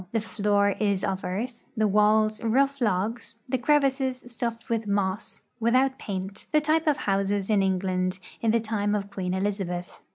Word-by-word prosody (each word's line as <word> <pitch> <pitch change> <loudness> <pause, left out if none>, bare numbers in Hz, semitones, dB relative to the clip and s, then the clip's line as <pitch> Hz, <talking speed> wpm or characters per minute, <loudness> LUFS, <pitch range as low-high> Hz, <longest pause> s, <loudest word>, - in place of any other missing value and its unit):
The 225 - +2
floor 205 -2 +1
is 200 -2 +1
of 195 -2 -1
earth; 230 +7 -4
the 215 -1 +3
walls, 215 +1 +3
rough 275 +4 +2
logs, 220 +3 -1
the 260 0 0
crevices 265 -1 +2
stuffed 230 -1 -4
with 225 -2 -1
moss, 200 0 -1 0.2
without 255 +4 +2
paint 195 0 -5
— - - -37
the 305 - +5
type 310 +2 +1
of 295 -2 +4
houses 200 -3 0
in 205 -2 +4
England 185 -1 0 0.2
in 230 - +2
the 230 +1 +4
time 210 -2 -1
of 200 -1 -3
Queen 185 -2 -2
Elizabeth. 190 -3 -3
210 Hz, 170 wpm, -26 LUFS, 195-235 Hz, 0.2 s, the